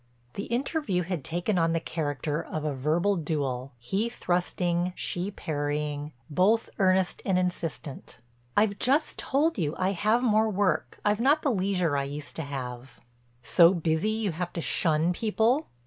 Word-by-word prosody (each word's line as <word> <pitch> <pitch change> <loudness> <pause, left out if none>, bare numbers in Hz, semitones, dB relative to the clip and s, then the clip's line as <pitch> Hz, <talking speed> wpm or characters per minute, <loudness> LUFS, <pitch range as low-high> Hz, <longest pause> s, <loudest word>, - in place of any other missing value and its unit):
The 200 - -4
interview 240 - -1
had 170 -3 -3
taken 175 +4 -1
on 165 0 +2
the 165 - +1
character 150 -1 -2
of 155 -2 -5
a 150 - 0
verbal 160 +9 +1
duel, 140 -5 -2
he 190 - -1
thrusting, 175 -3 -1
she 180 +3 -1
parrying, 150 -3 -3 0.2
both 195 +9 +2
earnest 185 -1 +2
and 190 -2 +1
insistent. 170 -6 -3 0.4
"I've 205 -1 +3
just 285 +5 +1
told 290 -1 +1
you; 155 -2 -1
I 185 +1 +1
have 215 +6 +1
more 220 -2 +3
work, 200 -2 0
I've 210 +1 +2
not 290 +5 +3
the 280 - +2
leisure 185 -7 +1
I 140 - 0
used 145 +1 -7
to - - -2
have." 130 -3 -6 0.4
"So 170 +8 +6
busy 160 +3 0
you 215 -2 -1
have 175 +2 -4
to - - -3
shun 160 +1 +2
people?" 225 - +1
175 Hz, 160 wpm, -27 LUFS, 150-205 Hz, 0.4 s, So